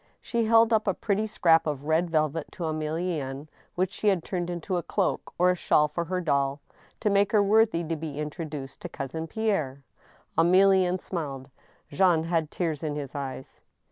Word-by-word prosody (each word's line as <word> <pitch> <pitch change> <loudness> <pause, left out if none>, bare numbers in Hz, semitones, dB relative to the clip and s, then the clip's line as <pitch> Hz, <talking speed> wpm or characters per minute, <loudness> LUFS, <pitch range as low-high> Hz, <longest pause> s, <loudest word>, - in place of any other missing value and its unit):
She 235 -1 -1
held 225 +1 +5
up 220 -1 +2
a 195 - +2
pretty 210 +1 -1
scrap 165 -6 +3
of 145 -2 -3
red 160 +3 +1
velvet 155 -1 0
to 175 - -6
Emilienne, 155 -3 -3 0.3
which 185 +1 0
she 215 - -3
had 190 -5 +3
turned 175 -2 -3
into 175 +2 -2
a - - -1
cloak 190 +2 -1
or 180 +1 +4
a - - 0
shawl 150 -3 +3
for 170 +3 -3
her 185 +2 -2
doll, 140 -4 0 0.4
to 210 - +2
make 200 0 +3
her 210 -2 +5
worthy 210 -4 +3
to 165 0 -2
be 155 -2 -6
introduced 150 -2 -6
to - - -6
Cousin 160 +4 -5
Pierre. 160 -10 -1 0.5
Emilienne 185 +1 +4
smiled, 140 -8 -5 0.4
Jean 165 +1 +3
had 165 -2 0
tears 160 -5 -2
in 150 -2 -3
his 145 -3 -5
eyes. 135 -2 -7
165 Hz, 180 wpm, -27 LUFS, 150-190 Hz, 0.5 s, held